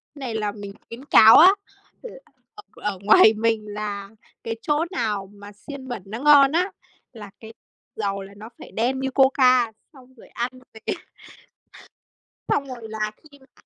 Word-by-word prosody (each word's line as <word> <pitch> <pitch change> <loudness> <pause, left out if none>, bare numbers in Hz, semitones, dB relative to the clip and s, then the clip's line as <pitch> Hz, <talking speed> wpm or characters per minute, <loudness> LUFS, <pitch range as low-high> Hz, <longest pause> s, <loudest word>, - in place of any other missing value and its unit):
này 260 -6 -6
là 210 -2 -2
mình 200 -1 -10
khuyến 250 +5 -11
cáo 220 -5 +7
á, 355 - +9 0.5
là - - -10 0.4
ở 415 - -13 0.2
ở 200 -3 -3
ngoài 215 +2 +6
mình 220 0 -1
là 205 -1 -6 0.3
cái 225 - -4
chỗ 300 +2 0
nào 210 - -3
mà 205 0 -13
xiên 265 +5 -11
bẩn 240 -7 -6
nó 215 +4 -7
ngon 285 -1 +6
á, 360 +5 0 0.4
là 210 -3 -11
cái 225 0 -12 0.4
dầu 200 -2 -3
là 195 +1 -11
nó 220 +3 -11
phải - - -12
đen 255 +4 -1
như 265 0 -3
coca, 255 -3 +3 0.2
xong 260 -2 -18
rồi 230 - -17
ăn 240 +1 -4 0.2
với 220 - -14
cái - - -2 1.5
xong 280 -1 0
rồi 240 -3 -9
là 215 -1 -3
khi 285 -2 -20
mà 265 -1 -26
230 Hz, 175 wpm, -22 LUFS, 210-265 Hz, 1.5 s, á